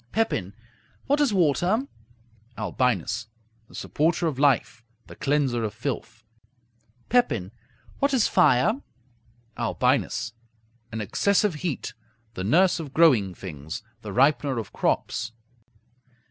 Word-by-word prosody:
Pepin 100 - -1 0.5
What 285 +2 +2
is 285 -5 +3
water? 185 - +2 0.7
Albinus 110 +1 -1 0.4
The - - -15
supporter 165 +3 0
of 150 -5 -1
life; 135 -4 +2 0.2
the - - -12
cleanser 135 -5 0
of 105 -3 -3
filth. - - -5 0.9
Pepin 120 - +2 0.5
What 280 0 +2
is 255 -6 +3
fire? 185 - +3 0.8
Albinus 110 - 0 0.6
An 110 0 -4
excessive 200 - +2
heat; 155 -1 -4 0.4
the 95 - -4
nurse 175 - +3
of 145 -4 -7
growing 120 - +4
things; 80 +4 -7 0.2
the 110 - -7
ripener 135 +3 +2
of 110 - -7
crops. 115 -1 -1
140 Hz, 110 wpm, -25 LUFS, 110-180 Hz, 0.9 s, growing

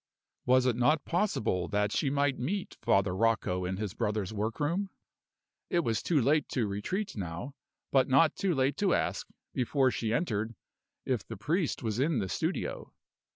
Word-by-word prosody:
Was 130 0 +5
it 125 -3 +2
not 140 +5 +2
possible 140 - 0
that 105 +1 0
she 140 - +1
might 140 -1 +1
meet 180 +10 -3
Father 95 -1 +2
Rocco 95 -4 +1
in 95 +1 -2
his 105 -2 -3
brother's 105 -1 -2
work 110 +2 -2
room? 175 +7 0 0.8
It 175 - +2
was 115 -8 0
too 165 -4 +2
late 145 +4 +2
to 120 -4 0
retreat 105 - -3
now, 95 +7 -5 0.4
but 135 -1 +4
not 140 +4 +4
too 190 -4 0
late 135 +1 +1
to 200 -3 +3
ask, - - -1 0.3
before 130 +1 +2
she 110 -3 -2
entered, 115 -4 -1 0.5
if 125 -6 0
the 115 - -8
priest 155 - -1
was 110 0 -1
in 145 +1 +2
the 95 -4 -1
studio. - - -2
125 Hz, 170 wpm, -30 LUFS, 105-150 Hz, 0.8 s, Was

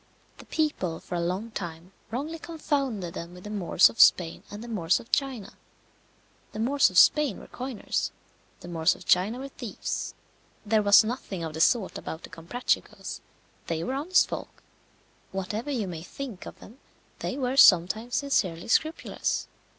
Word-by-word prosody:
The - - -12
people 240 - -1
for - - -9
a 175 - 0
long 185 +7 -2
time 170 -2 -7 0.2
wrongly 295 +8 -4
confounded 275 - -2
them 170 +1 -7
with 180 - -12
the 210 - -7
Moors 190 -3 +5
of 230 - -9
Spain 165 -2 +5
and 205 +2 -8
the - - -8
Moors 185 -7 +1
of 235 - -14
China. 260 -8 -1 1.0
The 215 - -6
Moors 275 +5 +3
of 185 - -4
Spain 295 -3 +5
were - - -11
coiners, 255 -3 -3 0.5
the - - -10
Moors 165 -2 +2
of - - -14
China 195 +7 +3
were 270 +2 -6
thieves. 240 -5 -5 0.5
There 215 +1 +3
was 205 +1 +7
nothing 215 -6 -4
of 160 -1 -4
the 160 - -3
sort 210 +1 +2
about 160 - -7
the - - -10
Comprachicos; 170 +10 -3 0.5
they 165 -1 -2
were 255 - -2
honest 310 +7 +3
folk. - - -7 0.7
Whatever 210 +7 -4
you 235 -8 -1
may 165 -3 -6
think 225 +2 -8
of - - -10
them, 235 +6 -14 0.4
they 260 - -3
were 260 -1 -1
sometimes 215 +1 +5
sincerely 190 - 0
scrupulous. 315 +8 0
215 Hz, 165 wpm, -27 LUFS, 175-265 Hz, 1.0 s, was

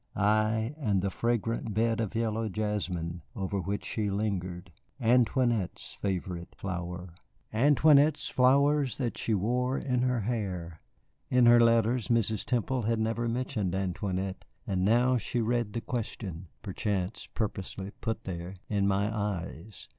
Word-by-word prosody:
Ay, 110 +4 +2
and 100 -9 +1
the 100 - 0
fragrant 115 -1 -1
bed 115 0 +2
of 115 -1 -2
yellow 115 -1 0
jasmine 90 -5 -2
over 95 +1 -2
which 100 +3 -3
she 105 -2 -1
lingered, 95 -3 -2 0.3
Antoinette's 120 -3 +2
favorite 90 -3 -4
flower. 90 -1 -5 0.4
Antoinette's 145 +4 +5
flowers 140 +1 +3
that 125 -4 -2
she 110 - 0
wore 125 +6 0
in 125 -2 0
her 125 -2 +1
hair! 95 -7 -3 0.5
In 125 -1 +5
her 120 0 +8
letters 115 0 +3
Mrs. 110 -3 +2
Temple 125 +1 0
had 115 +1 +1
never 115 +2 0
mentioned 115 -6 -1
Antoinette, 95 0 -2 0.2
and 95 -5 0
now 120 +5 +4
she 120 +2 -2
read 115 -2 0
the 115 - -2
question 100 - -4 0.2
(perchance 95 -1 -2
purposely 100 -2 -3
put 110 - -2
there) 90 0 -5
in 100 -2 +1
my 100 +3 +1
eyes. 100 -1 -4
110 Hz, 135 wpm, -29 LUFS, 95-120 Hz, 0.5 s, her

